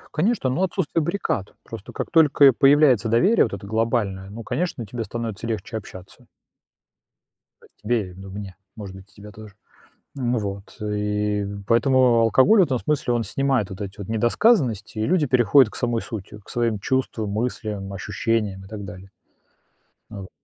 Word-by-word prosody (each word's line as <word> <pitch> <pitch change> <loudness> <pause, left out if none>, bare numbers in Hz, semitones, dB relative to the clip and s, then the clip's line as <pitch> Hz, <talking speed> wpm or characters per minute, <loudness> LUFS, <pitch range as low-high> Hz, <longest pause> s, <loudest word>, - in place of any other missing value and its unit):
Конечно, 170 - +1
ну, 170 +9 0
отсутствие 170 -3 -1
баррикад. 170 - -2
Просто - - -9
как - - -5
только 150 -3 +5
и 135 - +9
появляется 135 -3 +4
доверие 185 - +4
вот 110 - -3
это 100 0 -7
глобальное, 110 -3 -1
ну, 115 +3 -8
конечно, 160 -7 -3
тебе 115 +3 -5
становится 115 0 -5
легче 110 0 -4
общаться. 95 -4 -10 1.4
А - - -18 0.2
тебе 105 -3 -1
и - - -13
ду 95 +2 -11
мне, 100 -2 -8 0.2
может 100 -3 -8
быть, 95 0 -14
и - - -25
тебя 105 +1 -12
тоже. 105 -2 -13 0.6
Ну 125 -3 -1
вот. 100 -1 -6
И 105 0 -1 0.2
поэтому 120 +1 +4
алкоголь 130 - +5
в - - +6
этом 135 -6 -1
смысле, 140 -3 -1
он 115 -1 0
снимает 125 0 0
вот 95 +2 -9
эти 100 +1 -7
вот 100 - -7
недосказанности, 120 - +1
и 110 - 0
люди 175 -4 +2
переходят 125 -1 +4
к - - -9
самой 120 -2 -1
сути, 105 -3 -8
к - - -24
своим 115 -3 0
чувствам, 115 -2 -2
мыслям, 105 -3 -3
ощущениям 100 0 -2
и 95 - -13
так 105 -1 -7
далее. 95 +1 -10 1.0
А 105 - -8
вот. 95 - -10
115 Hz, 175 wpm, -23 LUFS, 100-130 Hz, 1.4 s, и